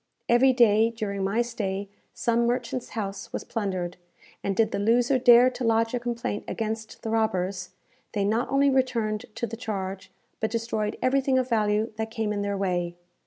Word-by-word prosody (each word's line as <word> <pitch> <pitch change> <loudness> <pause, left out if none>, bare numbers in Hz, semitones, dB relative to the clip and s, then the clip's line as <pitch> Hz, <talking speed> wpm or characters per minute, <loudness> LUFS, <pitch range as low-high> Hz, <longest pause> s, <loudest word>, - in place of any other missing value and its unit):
Every 245 +3 +5
day 225 -3 +5
during 205 -4 -3
my 210 +5 +1
stay, 200 -4 -3 0.2
some 235 0 +1
merchant's 245 +1 -2
house 200 -2 -4
was - - -4
plundered, 185 -5 -3 0.5
and 195 - -1
did 220 +1 +2
the - - -1
loser 240 +5 +3
dare 245 0 +7
to 250 0 -6
lodge 225 0 +2
a 245 - 0
complaint 235 -3 -3
against 220 0 -4
the 225 - -3
robbers, 190 -4 0 0.4
they 200 -2 0
not 225 +4 0
only 275 0 +3
returned 235 -4 0
to - - -2
the 230 0 -6
charge, 195 -4 -5 0.3
but 220 - 0
destroyed 220 -2 -2
everything 265 0 +2
of 255 0 0
value 215 -1 +1
that 220 0 -2
came 220 -2 -2
in 205 - -2
their 200 0 -1
way. 175 -3 -1
225 Hz, 175 wpm, -26 LUFS, 205-240 Hz, 0.5 s, dare